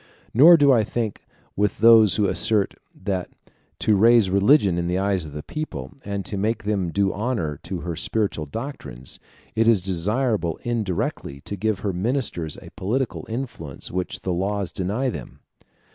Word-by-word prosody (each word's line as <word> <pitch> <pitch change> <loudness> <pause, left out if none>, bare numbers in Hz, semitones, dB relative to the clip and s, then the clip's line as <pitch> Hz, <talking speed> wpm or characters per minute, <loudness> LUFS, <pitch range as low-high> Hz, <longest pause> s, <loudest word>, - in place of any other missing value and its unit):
Nor 160 +8 +8
do 145 -2 +5
I 115 -4 +4
think 110 -1 -4 0.3
with 105 -1 0
those 110 -3 +7
who 105 - +2
assert, 105 +1 +1 0.2
that 95 -1 -3 0.5
to 105 - +2
raise 110 -1 +5
religion 100 - +4
in 85 - -1
the 90 +1 0
eyes 95 -3 0
of 75 - -9
the 75 0 -6
people, 80 - -5
and 100 -1 -4
to 100 - -4
make 110 +2 -1
them 100 -4 -1
do 100 +2 +1
honor 100 - -2
to 90 -1 -5
her 85 -2 -4
spiritual 85 -3 -1
doctrines, 70 - -6 0.3
it 115 0 +2
is 115 -3 +5
desirable 100 0 0
indirectly 100 -11 -2
to 100 - -5
give 105 0 -1
her 100 -2 -1
ministers 95 - -1
a - - -12
political 120 +7 -2
influence 110 - -6
which 90 0 -3
the 90 - -1
laws 100 +1 -1
deny 110 +8 -1
them. - - -8
100 Hz, 165 wpm, -23 LUFS, 90-115 Hz, 0.5 s, Nor